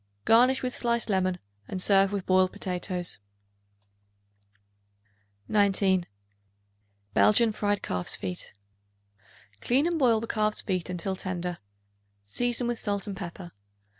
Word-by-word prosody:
Garnish 250 +4 +4
with 250 -1 -3
sliced 235 -2 0
lemon, 185 -1 +1 0.3
and 185 - -4
serve 195 +1 +4
with 200 -2 -3
boiled 185 0 +3
potatoes. 180 - -3 2.3
19. 195 -3 +2 1.1
Belgian 220 +1 +4
Fried 205 -1 -1
Calf's 90 -1 0
Feet. 90 -2 -4 1.1
Clean 265 +5 +2
and 340 -1 0
boil 235 -5 +4
the 230 - -4
calf's 215 -1 0
feet 185 -3 -2
until 180 +2 -2
tender; 180 -1 -4 0.6
season 240 - 0
with 240 -1 -2
salt 200 -2 -2
and 200 -2 -5
pepper. 175 -1 -8
195 Hz, 115 wpm, -27 LUFS, 185-230 Hz, 2.3 s, Garnish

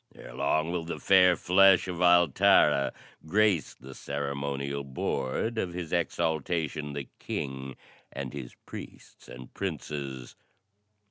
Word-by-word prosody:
"Ere - - -11
long 80 +2 0
will 85 -2 -2
the 85 - -5
fair 90 -2 +5
flesh 95 +1 +5
of 90 -1 -4
Altara 85 -5 +4 0.4
grace 100 -2 +2
the 65 +1 -12
ceremonial 70 0 -4
board 70 - -2
of 90 -4 -2
His 85 -2 -5
Exaltation, 80 -3 -1
the 70 -1 -5
King, 65 -1 -5 0.4
and - - -6
his 65 -4 -8
priests - - -11
and 65 0 -11
princes." 70 -8 -5
80 Hz, 120 wpm, -28 LUFS, 70-90 Hz, 0.4 s, fair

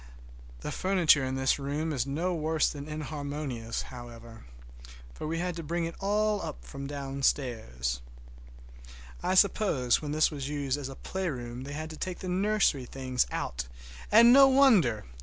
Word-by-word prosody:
The - - -4
furniture 180 -7 +3
in 130 0 -2
this 130 +2 +1
room 150 +3 -2
is 130 -1 -1
no 165 +6 -1
worse 160 -1 +1
than 145 0 -7
inharmonious, 145 -6 -4
however, 115 - -11 0.7
for 155 - -6
we 165 +1 -2
had 175 0 -2
to - - -4
bring 170 +2 -1
it 165 - -4
all 205 -5 0
from 140 0 -7
downstairs. 125 - -2 1.2
I 185 - 0
suppose 185 - +3
when 150 -2 -4
this 155 +2 +3
was 140 -2 -5
used 140 -3 -1
as 135 -2 -5
a 135 - -8
playroom 130 -11 -4
they 140 - -6
had 155 +1 -5
to 155 - -9
take 185 +2 -4
the 185 - -6
nursery 190 -7 +2
things 130 -1 -1
out, - - -3 0.4
and 235 +3 +8
no 275 0 +9
wonder! 225 - +4
145 Hz, 160 wpm, -29 LUFS, 130-180 Hz, 1.2 s, no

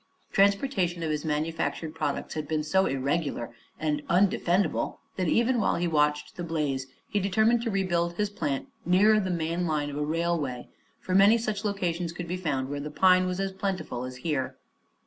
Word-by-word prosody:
Transportation 195 -4 +2
of 160 - -1
his 150 -1 -2
manufactured 160 +1 -2
products 150 -3 -3
had 155 -2 -4
been 155 0 -1
so 190 +5 +2
irregular 135 -1 -1 0.3
and 150 -1 0
undefendable 185 -1 +2 0.2
that 185 -2 -1
even 235 +7 +2
while - - +2
he 175 +1 0
watched 150 -2 +1
the 175 - -5
blaze 150 -5 -2 0.2
he 205 - 0
determined 220 +5 +3
to 235 - -2
rebuild 175 -4 0
his 210 +3 -1
plant 145 -8 -2 0.2
nearer 205 +5 +5
the 190 -3 -2
main 170 0 -1
line 150 -2 -1
of 145 - -5
a 150 - 0
railway, 155 -5 -1 0.3
for 185 - -4
many 200 +4 +7
such 215 -2 -3
locations 175 -5 -1
could 175 0 -6
be 180 - -2
found 145 -8 -1
where 145 +1 -4
the 150 +1 -5
pine 185 +3 +4
was 180 0 -2
as 195 0 -1
plentiful 190 -10 -3
as 130 0 -6
here. 145 -5 -1
170 Hz, 185 wpm, -27 LUFS, 150-195 Hz, 0.3 s, many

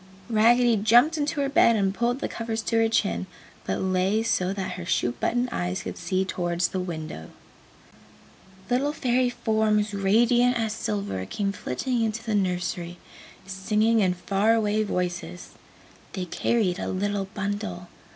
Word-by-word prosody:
Raggedy 235 +1 +4
jumped 240 +10 +5
into 295 0 -1
her 275 - +1
bed 275 -5 +4
and 195 -2 +1
pulled 240 +5 -1
the - - -1
covers 225 -1 -4
to 230 - 0
her 225 0 +3
chin, 200 -4 0 0.4
but - - -1
lay 190 +3 +1
so 185 -4 0
that 195 -1 -3
her 180 - -6
shoe 170 -8 0
button 245 - -1
eyes 180 -1 -2
could - - -5
see 190 0 -1
towards 175 -1 -1
the 190 - -3
window. 160 - -6 1.4
Little 270 +4 +1
Fairy 250 -3 +1
forms 215 -3 0
radiant 240 +5 +3
as 220 -2 -1
silver 100 - -3
came 200 - -2
flitting 235 - -2
into 225 0 -1
the 220 -2 -2
nursery, 180 -2 -1 0.5
singing 210 +4 +1
in 185 -3 +2
far 200 +5 +1
away 215 -1 +1
voices. 175 - -3 0.6
They 185 - -3
carried 190 0 0
a - - -3
little 200 +1 -1
bundle. 200 -3 -4
205 Hz, 150 wpm, -25 LUFS, 185-230 Hz, 1.4 s, jumped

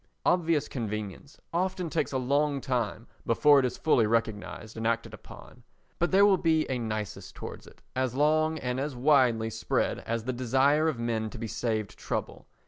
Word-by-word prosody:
Obvious 165 -4 +2
convenience 110 +2 -5
often 185 0 -1
takes 155 -2 -1
a 135 - 0
long 140 +2 +1
time 120 -4 -2 0.2
before 145 +5 +5
it 130 - +2
is 125 - -3
fully 120 -8 +3
recognised 110 -1 -2
and 110 0 -2
acted 115 -1 -1
upon, 110 - -13 0.4
but 175 - +2
there 195 +1 +6
will 195 -2 +4
be 160 -2 +2
a 130 - -1
nisus 110 -3 -4
towards - - -9
it - - -18
as 130 -1 -1
long 155 +2 +2
and 125 -3 -2
as 140 0 -3
widely 120 -4 +3
spread 110 0 -1
as 115 0 -3
the 130 +2 -2
desire 135 +5 +2
of 155 -6 0
men 115 -2 -2
to 120 - -9
be 115 - -5
saved 110 -2 -3
trouble. - - -4
125 Hz, 180 wpm, -28 LUFS, 115-150 Hz, 0.4 s, there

